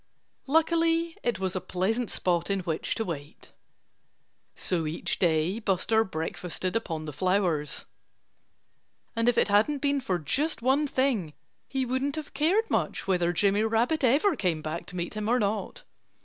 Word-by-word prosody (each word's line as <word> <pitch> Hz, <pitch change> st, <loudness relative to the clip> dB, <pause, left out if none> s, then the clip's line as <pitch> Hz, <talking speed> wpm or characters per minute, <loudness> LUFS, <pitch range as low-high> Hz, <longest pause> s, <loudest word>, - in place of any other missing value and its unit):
Luckily 330 Hz, +2 st, +2 dB
it 240 Hz, -4 st, 0 dB
was 190 Hz, -1 st, -2 dB
a 185 Hz, -, -1 dB
pleasant 220 Hz, +6 st, -1 dB
spot 175 Hz, -1 st, 0 dB
in 195 Hz, -1 st, +1 dB
which 165 Hz, -3 st, -2 dB
to 225 Hz, -, -2 dB
wait. 150 Hz, -4 st, -7 dB, 1.0 s
So 170 Hz, -4 st, -1 dB
each 155 Hz, +2 st, -2 dB
day 170 Hz, +4 st, +2 dB
Buster 220 Hz, +1 st, +2 dB
breakfasted 180 Hz, +1 st, -4 dB
upon 165 Hz, -8 st, -2 dB
the 150 Hz, -, -6 dB
flowers. 175 Hz, -2 st, 0 dB, 1.3 s
And 230 Hz, +1 st, +3 dB
if 240 Hz, -, +1 dB
it -, -, +3 dB
hadn't 215 Hz, +9 st, +3 dB
been 280 Hz, 0 st, +1 dB
for 185 Hz, -7 st, 0 dB
just 260 Hz, -, -1 dB
one 275 Hz, +4 st, +3 dB
thing 250 Hz, -, 0 dB, 0.3 s
he 265 Hz, -1 st, -1 dB
wouldn't 260 Hz, +3 st, -1 dB
have 310 Hz, -1 st, -6 dB
cared 385 Hz, +9 st, +2 dB
much -, -, 0 dB
whether 175 Hz, -2 st, +2 dB
Jimmy 200 Hz, +4 st, +2 dB
Rabbit 230 Hz, +8 st, +1 dB
ever 295 Hz, -, +4 dB
came 175 Hz, -, -1 dB
back 155 Hz, +2 st, -4 dB
to 180 Hz, -, -9 dB
meet 175 Hz, -1 st, -3 dB
him 215 Hz, 0 st, -2 dB
or 245 Hz, -, +4 dB
not. 215 Hz, -, -2 dB
210 Hz, 160 wpm, -28 LUFS, 175-265 Hz, 1.3 s, ever